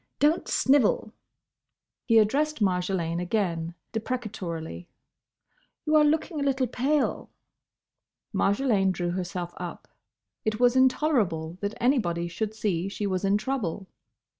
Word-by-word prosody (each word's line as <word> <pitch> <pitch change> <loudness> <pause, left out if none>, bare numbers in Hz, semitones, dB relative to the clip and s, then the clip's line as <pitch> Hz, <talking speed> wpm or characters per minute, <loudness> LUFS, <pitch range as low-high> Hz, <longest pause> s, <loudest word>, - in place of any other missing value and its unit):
Don't 300 +3 +2
snivel." 260 -5 +2 0.9
He 230 -2 +4
addressed 290 +8 +2
Marjolaine 180 -3 0
again, 170 -4 -1 0.2
deprecatorily, 200 -9 -4 1.0
"You 310 0 +2
are 305 - +7
looking 310 +1 +1
a - - 0
little 270 -2 +1
pale." 270 +5 0 1.0
Marjolaine 200 -3 +2
drew 175 -1 -2
herself 180 -1 -4
up. 175 -1 -7 0.6
It 215 -1 -1
was 245 0 +4
intolerable 220 - +2
that 205 +1 -2
anybody 185 -10 +1
should 215 +5 -4
see 195 -4 -1
she 205 +1 -4
was 185 -1 -1
in 195 +1 +3
trouble. 210 -6 -3
210 Hz, 115 wpm, -27 LUFS, 180-260 Hz, 1.0 s, are